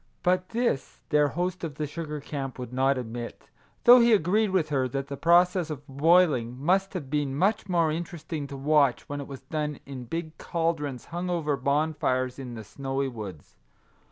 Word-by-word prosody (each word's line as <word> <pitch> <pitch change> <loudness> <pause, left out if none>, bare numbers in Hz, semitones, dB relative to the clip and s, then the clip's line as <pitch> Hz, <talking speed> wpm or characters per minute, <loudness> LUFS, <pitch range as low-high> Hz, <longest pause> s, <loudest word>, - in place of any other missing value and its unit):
But 180 +1 +2
this 230 - -1
their 150 0 +4
host 180 +5 -2
of 155 -4 -4
the 150 - -2
sugar 150 0 -5
camp 135 -2 -5
would 125 -1 -7
not 135 +1 +2
admit, 120 -1 -7 0.3
though 245 +1 +9
he 235 -1 +5
agreed 210 +3 +3
with 185 -5 +1
her 135 -3 +1
that 135 +2 -4
the 140 - -3
process 175 +2 +4
of 145 -2 -6
boiling 140 -4 +3
must 190 +6 +1
have 140 -7 -5
been 145 -2 0
much 200 +5 +1
more 170 -3 +2
interesting 160 -2 -4
to 140 -1 -7
watch 140 -2 +2
when 145 0 -4
it 140 - -8
was 135 -2 -8
done 150 +1 -3
in 130 -3 -7
big 160 +4 -5
cauldrons 160 -6 -2
hung 175 +1 -2
over 160 -5 0
bonfires 140 -2 0
in 125 -3 -6
the 110 - -7
snowy 135 +4 -3
woods. 100 - -9
150 Hz, 185 wpm, -27 LUFS, 135-170 Hz, 0.3 s, though